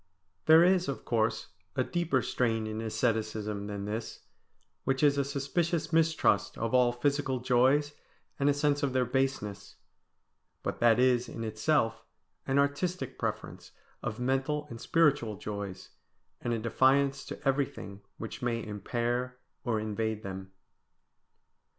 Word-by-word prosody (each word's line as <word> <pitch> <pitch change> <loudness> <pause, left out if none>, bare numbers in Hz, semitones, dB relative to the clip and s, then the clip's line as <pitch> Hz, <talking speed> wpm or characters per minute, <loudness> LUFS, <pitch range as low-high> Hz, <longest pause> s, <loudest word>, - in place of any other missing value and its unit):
There 160 +1 +8
is, 180 0 +3
of 140 - -4
course, 110 -4 0 0.3
a 130 - +2
deeper 170 -5 0
strain 115 -3 0
in 110 0 -4
asceticism 110 -3 -1
than 100 -1 -4
this, 110 +2 -5 0.6
which 135 +2 0
is 145 -1 +5
a - - +3
suspicious 155 +4 -1
mistrust 160 -10 +2
of 115 +1 -2
all 125 -1 +5
physical 135 +1 0
joys 130 +4 +3 0.5
and 140 +1 +3
a - - +4
sense 145 0 +1
of 140 -3 0
their 130 -1 +2
baseness; 125 -6 -2 0.9
but - - -3
that 115 -2 +5
is 125 -1 +3
in 115 - -6
itself 110 +2 0 0.4
an 135 - +1
artistic 145 +6 0
preference - - -4 0.3
of 110 +1 -4
mental 135 +4 0
and 115 - -8
spiritual 145 -10 +2
joys, 100 -1 -6 0.5
and 120 - -2
a 115 - +1
defiance 135 +4 +2
to - - -7
everything 130 -7 -1 0.2
which 110 - -7
may 115 -2 -1
impair 120 +4 -2 0.3
or 115 -5 0
invade 110 0 -2
them. 95 0 -7
125 Hz, 140 wpm, -30 LUFS, 110-140 Hz, 0.9 s, There